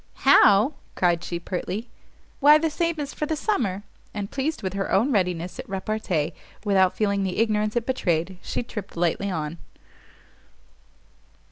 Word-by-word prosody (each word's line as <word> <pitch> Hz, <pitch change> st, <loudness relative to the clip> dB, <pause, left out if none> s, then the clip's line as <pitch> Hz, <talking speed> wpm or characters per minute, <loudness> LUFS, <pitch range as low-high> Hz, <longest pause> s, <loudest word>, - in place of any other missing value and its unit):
"How?" 225 Hz, -1 st, +6 dB, 0.2 s
cried 175 Hz, -2 st, +2 dB
she, 170 Hz, -1 st, -4 dB
pertly, 185 Hz, +5 st, -4 dB, 0.5 s
"why, 295 Hz, +2 st, +8 dB
the 320 Hz, 0 st, 0 dB
same 335 Hz, +1 st, 0 dB
as 290 Hz, -1 st, -4 dB
for 300 Hz, -, -3 dB
the 315 Hz, -, 0 dB
summer!" 230 Hz, -, -1 dB, 0.3 s
And 205 Hz, -1 st, -4 dB
pleased 285 Hz, +1 st, -2 dB
with 190 Hz, -1 st, -2 dB
her 195 Hz, 0 st, -2 dB
own 230 Hz, +9 st, +3 dB
readiness 180 Hz, -4 st, -1 dB
at -, -, -7 dB
repartee, 190 Hz, -5 st, -2 dB, 0.3 s
without 190 Hz, -3 st, +3 dB
feeling 200 Hz, -2 st, +1 dB
the 185 Hz, -1 st, -2 dB
ignorance 215 Hz, -1 st, +1 dB
it 235 Hz, -1 st, 0 dB
betrayed, 180 Hz, -7 st, -1 dB
she -, -, -3 dB
tript 210 Hz, -6 st, -8 dB
lightly 175 Hz, +4 st, 0 dB
on. 160 Hz, -2 st, -4 dB
200 Hz, 150 wpm, -24 LUFS, 180-245 Hz, 0.5 s, why